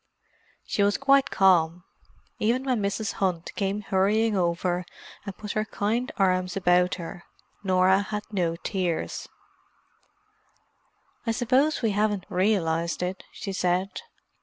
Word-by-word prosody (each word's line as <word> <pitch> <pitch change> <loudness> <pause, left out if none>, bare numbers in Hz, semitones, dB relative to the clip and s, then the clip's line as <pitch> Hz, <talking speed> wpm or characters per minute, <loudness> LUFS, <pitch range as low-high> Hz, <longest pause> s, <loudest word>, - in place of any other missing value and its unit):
She - - -1
was 205 0 +3
quite 275 0 +4
calm. 180 -3 +3 0.6
Even 240 +5 +1
when 255 -5 0
Mrs. 200 +2 -1
Hunt 180 -3 -1
came 200 +1 -1
hurrying 210 +3 +2
over, 175 0 0 0.4
and 195 - -6
put 210 -1 -5
her 215 - 0
kind 220 +4 -1
arms 185 -1 +1
about 180 -1 +3
her, 175 0 -8 0.4
Norah 190 0 +4
had 210 +1 -4
no 175 -5 0
tears. 180 -1 -3 2.0
"I - - +3
suppose 255 +6 +2
we 225 - +2
haven't 205 -2 0
realized 180 -4 +1
it," 185 +1 -4
she 195 - -6
said. 185 - 0
195 Hz, 125 wpm, -26 LUFS, 180-215 Hz, 2.0 s, quite